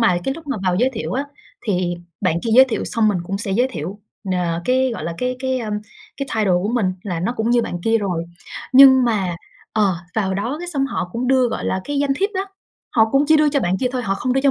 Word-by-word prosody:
mà 180 -7 +3
cái 270 - -1
lúc 325 0 -11
mà 280 -5 -2
vào 180 -1 +2
giới 250 +6 +2
thiệu 225 - -4
á, 270 +3 -1 0.4
thì 180 -3 0 0.3
bạn 180 -4 +1
kia 230 - -1
giới 260 - +9
thiệu 255 -4 -3
xong 225 -2 +1
mình 200 -4 +1
cũng 195 +2 -3
sẽ 200 -1 -4
giới 245 +6 +2
thiệu, 180 - -6 0.3
ờ, 175 -2 -1
cái, 260 +1 +2
gọi - - -6
là, 170 - -3
cái 250 0 -1
cái, 260 0 -1
a, 225 -3 -4 0.5
cái 275 - -3
title 210 -4 +2
của 205 - -1
mình 200 -7 +1
là 175 -5 -3
nó 185 +7 -1
cũng 220 +1 0
như 240 -1 +3
bạn 175 -4 -4
kia 225 0 +3
rồi. 180 -5 -2 0.5
Nhưng 265 -1 +8
mà, 195 -7 0 0.4
ờ, 205 -4 +2 0.2
vào 195 -3 0
đó 235 +9 -2
cái 350 - -6
xong 275 -5 0
họ 185 -9 -3
cũng 240 +2 -2
đưa, 260 -2 +4
gọi - - -4
là, 190 - -1
cái 290 -1 -2
danh 280 -1 +1
thiếp 395 +3 0
đó, 380 +1 -1 0.4
họ 220 -1 +3
cũng 275 +2 +4
chỉ 315 - +6
đưa 300 0 +4
cho 280 -1 +1
bạn 185 -2 0
kia 255 - 0
thôi, 255 - -2
họ 195 -4 0
không 250 +6 -1
đưa 270 - +2
cho 280 0 +4
230 Hz, 270 wpm, -20 LUFS, 190-265 Hz, 0.5 s, giới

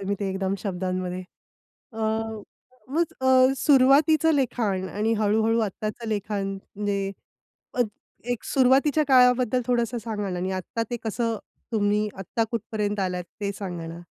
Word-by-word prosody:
तुम्ही 200 +1 -2
ते 195 - -1
एकदम 190 0 -1
शब्दांमध्ये. 185 -1 -3 0.7
अ, - - -10 0.9
मग 325 +3 0
अ, 260 0 +5
सुरुवातीचं 290 +3 +5
लिखाण 225 -9 0
आणि 215 +3 0
हळू-हळू 220 +2 +2
आत्ताचं 215 +2 -4
लिखाण 205 -1 -2
म्हणजे 200 0 -3 0.6
अ, 245 - +2 0.5
एक 245 - -3
सुरुवातीच्या 275 +3 +4
काळाबद्दल 250 -1 +5
थोडंसं 240 -1 +1
सांगा 215 -3 -3
ना 180 - -3
आणि 185 +1 -2
आत्ता 190 +5 -3
ते 240 - -1
कसं? 225 0 -1 0.3
तुम्ही 210 -1 +2
आत्ता 210 +4 -1
कुठपर्यंत 210 -2 -2
आलात? 180 -1 -1 0.2
ते 200 0 0
सांगा 175 -4 -5
ना. 165 +1 -8
215 Hz, 135 wpm, -25 LUFS, 195-250 Hz, 0.9 s, अ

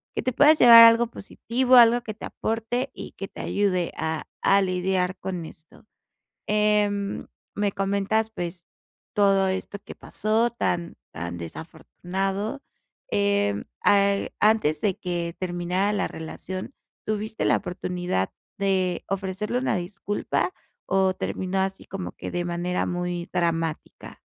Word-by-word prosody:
que - - -2
te 255 - 0
puedas 300 +4 +6
llevar 230 -1 +11
a - - +12
algo 230 +1 +4
positivo, 250 +3 0
algo 240 0 +7
que 220 -3 -6
te - - -8
aporte 230 +4 -2
y - - -8
que 195 - -7
te - - -9
ayude 185 -4 0
a 160 0 -2 0.2
a 200 0 +4
lidiar 185 0 0
con 180 -3 -4
esto. 160 +7 -14 0.6
Em, 210 -1 +1 0.3
me 205 -1 0
comentas, 200 +3 0
pues, 175 -2 -5 0.5
todo 195 -2 +4
esto 190 +2 -3
que - - -9
pasó 220 +3 0
tan 175 -7 -2 0.2
tan 85 +1 -5
desafortunado. 190 - -4 0.5
Em, 205 0 +1 0.2
ah, 200 0 +5 0.2
antes 210 -9 +3
de 195 -3 0
que 170 -2 -3
terminara 180 +2 -1
la 200 - 0
relación, 185 +8 -7 0.3
¿tuviste 215 0 -2
la - - +4
oportunidad 180 - -2 0.3
de 190 -3 0
ofrecerle 195 +4 -2
una 260 - 0
disculpa 180 0 -2 0.3
o 190 -1 +2
terminó 190 +1 -2
así 190 0 -2
como 195 -2 -6
que - - -7
de 175 0 -1
manera 175 +1 -1
muy 175 0 -3
dramática? 165 -3 -2
195 Hz, 135 wpm, -25 LUFS, 180-210 Hz, 0.6 s, a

